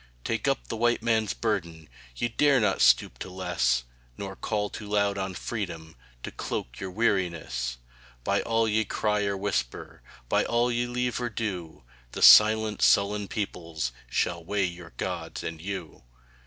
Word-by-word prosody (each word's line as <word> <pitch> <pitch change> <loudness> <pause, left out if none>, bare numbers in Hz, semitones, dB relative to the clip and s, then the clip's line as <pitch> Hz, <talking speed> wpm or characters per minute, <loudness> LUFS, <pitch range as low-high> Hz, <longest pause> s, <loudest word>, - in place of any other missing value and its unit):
Take - - -2
up - - 0
the - - -4
White 120 0 +1
Man's 110 -3 +1
burden 85 -8 -2 0.3
Ye 120 - 0
dare 135 +3 +3
not 105 -4 +1
stoop - - +4
to - - -6
less 90 -9 0 0.3
Nor 95 -1 -6
call 105 0 -2
too 105 - -7
loud 100 -1 +1
on 95 -1 -3
Freedom 85 -9 -5 0.3
To - - -5
cloak - - -5
your 95 - -4
weariness; 85 - -1 0.5
By 100 +9 +1
all 115 0 +1
ye 110 +1 +2
cry 105 0 0
or 100 -1 -1
whisper, 95 -11 -3 0.3
By - - +2
all 120 +1 +1
ye 120 +1 0
leave 125 0 -2
or 120 - -1
do, 90 - -5 0.3
The - - -2
silent, 110 0 +7
sullen 100 0 +3
peoples 85 - -3 0.2
Shall 85 +7 -1
weigh 100 +2 0
your 85 -4 -7
Gods - - -4
and 80 -1 -5
you. 95 -3 -6
100 Hz, 160 wpm, -27 LUFS, 85-110 Hz, 0.5 s, silent